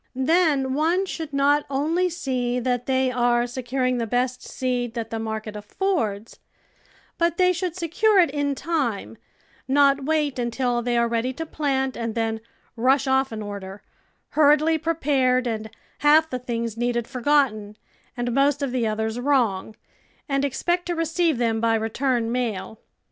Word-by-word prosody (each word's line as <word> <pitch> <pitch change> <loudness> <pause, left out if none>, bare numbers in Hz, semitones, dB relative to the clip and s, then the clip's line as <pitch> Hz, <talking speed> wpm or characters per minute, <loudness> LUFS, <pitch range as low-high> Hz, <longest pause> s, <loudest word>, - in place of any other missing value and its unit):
Then 275 -1 +2
one 330 +7 +1
should 320 -5 -6
not 285 +1 +3
only 320 +7 +1
see 250 -7 -2
that 245 0 -1
they 260 -1 +2
are 240 -1 +2
se 245 +2 -6
curinjy 255 0 -1
the 230 - -2
best 250 +2 -1
seed 245 -2 -3
that 225 -1 -4
the 225 - -3
market 220 -1 -4
affords 215 - -2 0.8
but 340 0 +1
they 365 0 +4
should 355 -1 -3
secure 370 +5 +2
it 340 -6 +4
in 285 -1 -1
time, 245 - -2 0.5
not 275 0 +3
wait 300 -3 0
until 240 0 0
they 240 0 0
are 235 0 +3
ready 235 +2 -1
to 325 +5 -5
plant 270 -4 -1
and 230 -2 -4
then 225 -1 -1 0.3
rush 260 +4 +2
off 265 0 +2
an 215 -1 -5
order, 200 -1 -7 0.5
hur 300 -1 +5
riedly 320 +1 0
prepared 270 -6 +1
and 220 -2 -3 0.3
half 305 +2 +5
the 255 - -2
things 235 -2 -3
needed 235 0 -1
for 255 -2 -7
gotten 230 -7 +1 0.4
and 245 0 -1
most 280 +1 +2
of 275 - -1
the 245 -3 0
others 220 +2 -2
^vrong, 240 -7 +1 0.5
and 275 -1 0
expect 345 +6 -1
to 350 - -1
receive 330 -2 +1
them 225 -2 0
by 230 -1 +3
return 230 +1 0
mail. 225 -3 -3
255 Hz, 165 wpm, -24 LUFS, 230-295 Hz, 0.8 s, hur